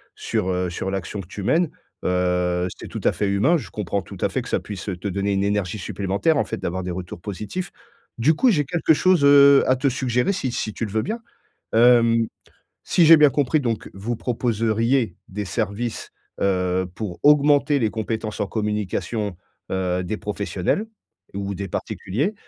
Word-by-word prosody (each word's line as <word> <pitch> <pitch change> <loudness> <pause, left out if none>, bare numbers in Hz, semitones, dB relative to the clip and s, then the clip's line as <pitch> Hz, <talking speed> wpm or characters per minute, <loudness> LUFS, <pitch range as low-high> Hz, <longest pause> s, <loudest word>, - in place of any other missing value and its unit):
sur, 95 - -2
heu, 90 -1 0
sur 95 +2 -4
l'action 95 +1 -4
que 90 - -13
tu 100 +1 -7
mènes. 165 - +2 0.3
Heu, 90 0 +1
c'est - - -9
tout - - -5
à - - +4
fait 105 - -1
humain 110 +13 +3
je 130 - -8
comprends 100 -1 -2
tout - - -11
à - - +2
fait - - -2
que - - -9
ça - - +1
puisse 100 -3 -8
te 100 - -4
donner 100 +1 -1
une 100 0 +1
énergie 100 -1 -1
supplémentaire 100 - 0
en 115 - +2
fait - - -4
d'avoir 90 +1 -3
des 90 - -4
retours 90 -1 -7
positifs. 105 - -5 0.5
Du 150 +8 +4
coup, 255 +7 +4
j'ai 150 -7 +2
quelque 160 +1 +2
chose, 180 -1 +3
heu, 140 -1 +7
à 130 - +4
te 130 +2 0
suggérer 125 +6 0
si 135 -9 -2
si 110 -3 -3
tu 115 - -3
le 100 - -7
veux 110 - +1
bien 225 - -3 0.5
hem, 115 -1 +5 0.6
si 170 - +3
j'ai 165 -1 +10
bien 150 -1 +6
compris 145 +3 +1
donc, 115 -5 -2
vous 110 +5 -3
proposeriez 115 -2 0
des 105 +1 -5
services, 110 +3 -3 0.3
heu, 95 -1 +1
pour 95 -6 -5
augmenter 145 0 +5
les 110 - +1
compétences 110 0 -4
en 100 - 0
communication, 105 -1 -2 0.4
heu, 90 -1 -1
des 105 +5 -3
professionnels 105 - -2 0.5
ou 100 0 -3
des 100 +1 -4
particuliers? 130 - -2
110 Hz, 185 wpm, -23 LUFS, 95-130 Hz, 0.6 s, j'ai